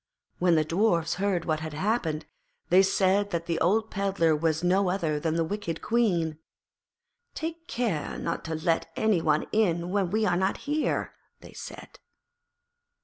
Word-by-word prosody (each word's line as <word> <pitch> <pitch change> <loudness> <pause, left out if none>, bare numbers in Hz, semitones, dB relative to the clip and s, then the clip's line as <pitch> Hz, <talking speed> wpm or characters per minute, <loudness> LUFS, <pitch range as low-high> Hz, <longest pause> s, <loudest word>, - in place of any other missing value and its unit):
When 175 -1 +4
the 155 -1 +2
Dwarfs 170 0 +1
heard 190 -4 0
what 155 -2 0
had 155 -1 -6
happened, 165 -4 -1 0.5
they 185 - +7
said 195 +1 +2
that 170 -3 -2
the 170 -1 -1
old 215 +6 +2
Pedlar 195 -5 +1
was 160 +1 0
no 185 +1 +3
other 165 -5 0
than 160 +1 -1
the 165 - +2
wicked 170 -2 -4
Queen. 175 -10 +1 1.0
'Take 330 +1 -5
care 220 -11 -2
not 170 - -3
to 160 0 -3
let 165 +1 0
any 215 -6 +2
one 155 -2 +2
in 175 -5 +1
when 195 -3 +1
we 215 +3 +1
are 180 -4 +2
not 190 +2 0
here,' 300 +1 -1 0.3
they - - -13
said. - - -10
175 Hz, 160 wpm, -27 LUFS, 165-205 Hz, 1.0 s, they